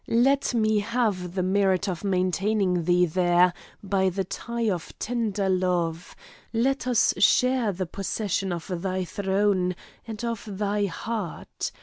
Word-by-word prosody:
Let 265 +2 +2
me 215 -2 +3
have 205 -5 -1
the 185 - 0
merit 190 0 +2
of 180 -1 -3
maintaining 185 -1 +1
thee 180 +1 +4
there 175 +1 +3 0.3
by 190 -1 +1
the 190 +2 -2
tie 235 +5 -3
of 180 -5 -2
tender 215 -4 -1
love; 180 -3 0 0.4
let 255 +3 0
us 245 -3 +3
share 250 +2 +4
the 185 0 -3
possession 195 +1 -2
of 170 -2 -4
the 185 0 -2
throne 195 -2 +1 0.3
and 225 +1 -5
of 230 -3 -2 0.2
thy 205 0 0
heart. 200 0 -5
195 Hz, 135 wpm, -26 LUFS, 180-220 Hz, 0.4 s, thee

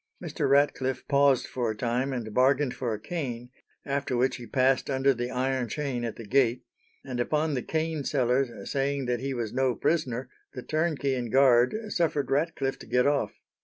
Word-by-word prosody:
Mr. - - -2
Ratcliffe 135 -2 +2
paused 140 -2 +4
for 120 -3 -2
a 110 - -4
time 125 +4 -1
and 115 -5 -4
bargained 130 +2 +3
for 125 -3 -3
a 105 - -3
cane, 125 -4 -5 0.3
after 140 -2 -1
which 125 0 +1
he 120 -2 -9
passed 130 +3 +2
under 135 0 +3
the 120 0 -3
iron 130 0 -1
chain 135 -2 -3
at 115 -2 -3
the 115 - -9
gate, 125 +1 +2 0.4
and 130 -3 -4
upon 150 +5 0
the 130 - -1
cane 160 0 -2
seller's 130 -1 +1 0.2
saying 140 0 0
that 120 -1 -1
he 135 +1 -3
was 115 -3 -3
no 130 -2 +1
prisoner, 130 -6 -1 0.3
the 125 - -6
turnkey 155 -3 0
and 120 -3 -3
guard 130 - +5
suffered 150 -8 0
Ratcliffe 140 -2 0
to - - -11
get 125 0 +2
off. 145 0 +1
130 Hz, 185 wpm, -27 LUFS, 125-140 Hz, 0.4 s, guard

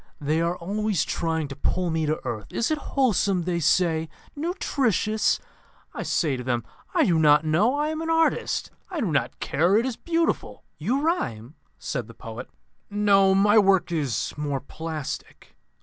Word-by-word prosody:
They 155 +3 0
are 170 +2 0
always 205 +2 -1
trying 160 -2 -1
to 140 - -6
pull 175 +4 -1
me 160 -1 0
to 155 - 0
earth. 110 -5 -4
'Is 235 - -1
it 310 - +1
wholesome?' 205 -11 +1
they 175 0 -1
say; 160 0 +2 0.3
'nutritious?' 270 - 0 0.5
I - - -5
say 150 -6 0
to 125 - -5
them, 120 -2 -1 0.3
'I - - +4
do 170 -3 +3
not 150 0 +5
know. 195 - +3
I 295 +1 0
am 315 0 -3
an 325 - -3
artist. 325 0 +1 0.2
I 360 -4 -4
do 210 - 0
not 140 - -1
care. 175 +7 +2
It 230 - +2
is 255 -3 -3
beautiful.'" 335 -1 -1 0.2
"You 240 - 0
rhyme?" 125 - -1 0.2
said - - -4
the - - -13
poet. - - -8 0.4
"No. 200 -2 +4
My 205 +3 +5
work 195 -3 +3
is 145 -9 -1
more 145 -2 -2
plastic. 155 +1 -7
180 Hz, 170 wpm, -25 LUFS, 155-225 Hz, 0.5 s, not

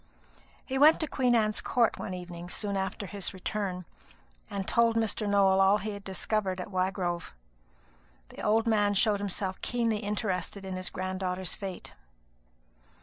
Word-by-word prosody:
He 265 0 -2
went 305 +3 +7
to 315 - 0
Queen 250 -4 +2
Anne's 215 -2 +2
Court 235 -2 +1
one 185 - -4
evening 175 -1 -8
soon 200 +1 -1
after 190 +1 -2
his 195 0 -4
return, 185 -1 -3 0.6
and 195 -1 -4
told 230 -1 +3
Mr. 220 -2 0
Nowell 195 -1 +4
all 195 +2 +5
he 210 +2 -4
had 200 -1 -8
discovered 190 0 -1
at 180 - -6
Wygrove. 185 - -1 0.9
The - - -10
old 220 +2 +2
man 205 -3 +2
showed 205 0 +3
himself 195 -1 -3
keenly 230 -3 0
interested 205 -2 -3
in 190 -1 -4
his 185 0 -1
grand 185 0 -4
daughter's 180 -1 -1
fate. 195 -3 -7
200 Hz, 155 wpm, -29 LUFS, 185-215 Hz, 0.9 s, went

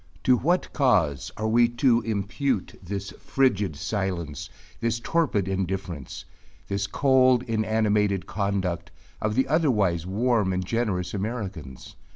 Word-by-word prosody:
To 130 - +5
what 175 +9 0
cause 85 - +2
are 110 - -1
we 120 +2 +5
to 120 0 +2
impute 110 +2 -2
this 100 +1 -5
frigid 105 - +1
silence 85 -4 -3 0.3
this 115 0 0
torpid 120 - 0
indifference 95 -6 -4 0.4
this 100 0 -1
cold 130 -2 +4
inanimated 110 -4 +1
conduct 95 -4 -2 0.3
of 110 0 0
the 130 - +2
otherwise 105 - +1
warm 105 -1 +1
and 90 0 -2
generous 100 -5 -1
Americans? 95 - -5
105 Hz, 120 wpm, -25 LUFS, 95-120 Hz, 0.4 s, To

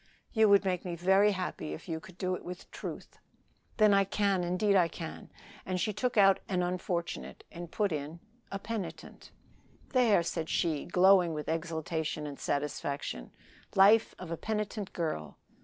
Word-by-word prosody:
"You 220 -2 +5
would 200 0 +5
make 180 -2 0
me 175 -2 -4
very 190 +4 +4
happy 180 - -4
if 75 - -9
you 160 -1 -3
could 180 +2 -15
do 185 -1 -1
it - - -5
with 180 0 -9
truth." - - -8 0.6
"Then 215 -2 +6
I 195 0 +5
can, 195 -1 +1
indeed 185 +4 +1
I 180 -3 +5
can." 165 -1 -8 0.3
And 185 -1 -2
she 215 +3 0
took 250 +2 -1
out 195 -1 +6
"an 180 -2 +1
unfortunate," 175 -1 -3
and 170 0 -8
put 205 +1 0
in 155 +2 -4 0.3
"a 195 - -2
penitent." 210 -1 -6 0.6
"There," 235 -9 +4
said 165 -1 -3
she, 160 -5 0
glowing 180 -2 +5
with 150 - -5
exultation 160 -1 -2
and 145 -2 -7
satisfaction, 140 - -3 0.5
"'Life 210 +4 +6
of 180 -2 -8
a 165 - -2
Penitent 210 -1 -3
Girl.'" 80 - -3
180 Hz, 165 wpm, -31 LUFS, 165-200 Hz, 0.6 s, Then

